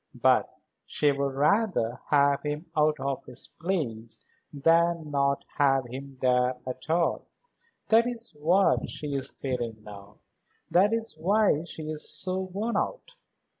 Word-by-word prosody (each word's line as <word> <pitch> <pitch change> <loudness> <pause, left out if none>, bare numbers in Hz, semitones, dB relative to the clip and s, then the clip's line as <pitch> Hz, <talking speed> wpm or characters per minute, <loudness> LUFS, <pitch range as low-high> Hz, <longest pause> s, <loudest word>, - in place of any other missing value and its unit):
But - - +3 0.3
she 145 -1 +2
would 140 -1 -2
rather 150 - +1
have 140 -1 +3
him 150 +2 -4
out 150 -1 +2
of 135 0 -3
his - - -8
place 125 -11 -3 0.3
than 165 +1 +2
not 140 -1 +1
have 135 -2 +3
him 135 +3 -8
there 125 0 +2
at 130 +3 -7
all. 170 +1 +1 0.6
That 230 +2 +5
is 235 -1 -4
what 180 +6 +3
she 150 -2 -5
is 135 -1 -3
feeling 120 -5 -3
now. 100 -1 -12 0.5
That 195 +4 +4
is 225 0 -2
why 195 -2 +3
she 160 - -7
is 155 -1 -2
so 185 0 -2
worn 195 +5 -2
out. - - -3
150 Hz, 140 wpm, -27 LUFS, 135-185 Hz, 0.6 s, That